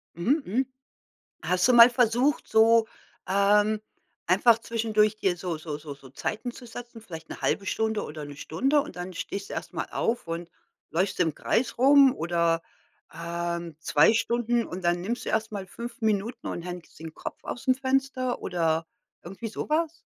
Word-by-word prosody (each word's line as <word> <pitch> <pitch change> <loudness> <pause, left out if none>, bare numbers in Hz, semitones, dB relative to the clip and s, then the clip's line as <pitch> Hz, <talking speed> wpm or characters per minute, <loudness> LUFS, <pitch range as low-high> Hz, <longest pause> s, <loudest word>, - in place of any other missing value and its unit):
Mhm, 250 - +1
mhm. 250 +8 0 0.8
Hast 180 +4 +2
du 255 - +4
mal 235 0 +10
versucht, 245 +3 +2
so, 225 0 +5 0.4
ähm, 205 +2 +3 0.5
einfach 220 +6 +5
zwischendurch 215 -2 +1
dir 190 -4 0
so 175 -3 -3
so 155 -2 -5
so 150 -1 -8
so 135 -2 -15
Zeiten 215 - -4
zu 245 - -12
setzen, 235 0 -9
vielleicht 165 -6 -10
'ne - - -8
1/2 200 - 0
Stunde 220 +2 -1
oder 150 0 -7
1 145 -1 -9
Stunde 270 - +1
und 235 - -9
dann 180 +1 -6
stehst 200 +3 -5
du - - -6
erst - - -6
mal - - -3
auf 235 -5 -1
und 170 +1 -4 0.4
läufst 185 +5 0
im 160 -4 +2
Kreis 235 +3 0
rum 275 +1 +6
oder, 170 0 +1 0.5
ähm, 170 0 -4
2 155 +4 +4
Stunden, 235 +1 +1
und 180 +1 -7
dann 175 0 +1
nimmst 230 +7 -3
du - - -3
erst 220 0 0
mal 200 -3 -5
5 235 +6 -8
Minuten 220 +2 -1
und 170 - -4
hängst 180 -3 -8
den 160 -1 -8
Kopf - - -8
ausm 255 +2 0
Fenster 260 -1 -1
oder 165 -2 0 0.4
irgendwie 195 +6 -7
so 220 - -5
was? 330 +1 0
210 Hz, 175 wpm, -27 LUFS, 170-240 Hz, 0.8 s, mal